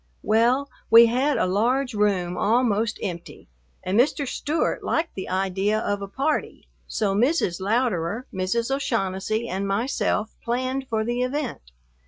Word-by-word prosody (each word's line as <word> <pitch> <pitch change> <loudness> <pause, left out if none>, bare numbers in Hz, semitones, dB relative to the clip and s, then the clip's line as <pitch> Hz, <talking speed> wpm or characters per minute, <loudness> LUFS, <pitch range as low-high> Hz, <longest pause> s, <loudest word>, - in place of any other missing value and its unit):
Well, 240 +6 +2 0.2
we 230 +1 +9
had 260 +5 +1
a - - +2
large 245 +7 +1
room 195 -4 +1
almost 225 -1 +1
empty 175 -4 -6 0.4
and 190 +4 +1
Mr. 280 +2 +2
Stewart 300 +5 -1
liked 330 +1 -1
the 190 - -6
idea 195 +3 0
of 205 -2 -2
a 200 - -4
party, 275 +9 -2 0.2
so 205 -3 0
Mrs. 225 - +1
Louderer, 220 0 0
Mrs. 230 +7 -1
O'Shaughnessy, 220 -3 -1
and 195 0 -2
myself 220 0 -1
planned 255 +2 -2
for 220 -2 0
the 240 +2 -1
event. 255 - -3
225 Hz, 140 wpm, -24 LUFS, 195-255 Hz, 0.4 s, we